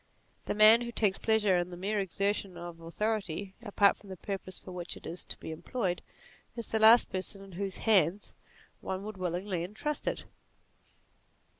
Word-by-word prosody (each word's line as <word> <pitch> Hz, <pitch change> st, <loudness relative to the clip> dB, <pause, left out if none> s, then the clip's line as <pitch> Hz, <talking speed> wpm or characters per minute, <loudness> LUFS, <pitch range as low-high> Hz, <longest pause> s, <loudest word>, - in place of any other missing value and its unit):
The -, -, -2 dB
man 215 Hz, +2 st, +8 dB
who 235 Hz, 0 st, -4 dB
takes 205 Hz, -4 st, +1 dB
pleasure 210 Hz, -5 st, +3 dB
in 175 Hz, 0 st, -2 dB
the 175 Hz, -, -8 dB
mere 205 Hz, +3 st, -1 dB
exertion 195 Hz, 0 st, -1 dB
of 170 Hz, -1 st, -8 dB
authority, 195 Hz, +1 st, -2 dB
apart 205 Hz, -3 st, +3 dB
from 200 Hz, -, -16 dB
the 190 Hz, -, -7 dB
purpose 190 Hz, 0 st, -5 dB
for 185 Hz, -, -10 dB
which 180 Hz, -1 st, -5 dB
it -, -, -14 dB
is 170 Hz, +1 st, -4 dB
to -, -, -5 dB
be -, -, -7 dB
employed, 180 Hz, +2 st, -2 dB, 0.5 s
is 235 Hz, -2 st, -6 dB
the 220 Hz, -, 0 dB
last 225 Hz, +2 st, +7 dB
person 190 Hz, +1 st, -4 dB
in 195 Hz, -, -13 dB
whose 195 Hz, +1 st, -4 dB
hands 195 Hz, -3 st, +3 dB, 0.5 s
one 190 Hz, +1 st, -4 dB
would 215 Hz, -1 st, -7 dB
willingly 180 Hz, 0 st, -2 dB
entrust 215 Hz, +11 st, -3 dB
it. -, -, -2 dB
195 Hz, 175 wpm, -31 LUFS, 180-215 Hz, 0.5 s, man